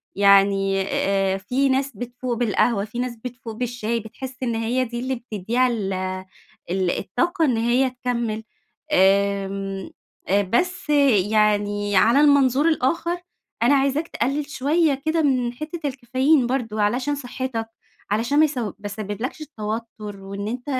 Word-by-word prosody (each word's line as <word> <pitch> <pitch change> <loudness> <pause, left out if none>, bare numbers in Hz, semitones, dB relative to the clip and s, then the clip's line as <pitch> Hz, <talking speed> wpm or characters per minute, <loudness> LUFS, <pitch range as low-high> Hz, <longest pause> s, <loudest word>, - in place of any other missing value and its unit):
يعني 195 -1 +4
آآ، 195 0 0
في 250 +8 0
ناس 270 +1 +1
بتفوق 245 +2 -4
بالقهوة، 225 -2 +1
في 220 +3 -7
ناس 250 -1 -2
بتفوق 240 0 -8
بالشاي، 235 -1 -2
بتحس 250 +4 -8
إن 235 -2 -1
هي 230 +3 0
دي 240 0 -5
اللي 260 +2 -2
بتدّيها 235 +1 0
ال 210 -6 -2 0.8
ال 185 -1 +1
الطاقة 330 - 0
إن 250 -6 +1
هي 240 +3 +2
تكَمِّل، 240 -3 -3 0.5
آمم 195 0 +1 0.6
بس 360 +5 0 0.4
يعني 205 -1 +2
على 235 +8 +5
المنظور 285 0 +4
الآخر، 335 +4 0 0.4
أنا 265 +4 +5
عايزاك 275 +4 +1
تقلِّل 280 +1 -1
شوية 290 0 +1
كده 320 +1 +2
من 255 -5 +1
حتَّة 305 +6 -6
الكافيين 260 +1 +2
برضه، 230 -4 -1
علشان 250 +8 +1
صحتَّك 255 -4 -4 0.4
علشان 235 +7 +2
ما 310 - +7
يس 295 -3 -4
ما 220 -5 -2
يسبِّبلَكش 210 +7 -4
توتُّر، 215 -1 -5
وإن 200 +1 -5
أنت 245 +3 -4
240 Hz, 135 wpm, -23 LUFS, 205-265 Hz, 0.8 s, ما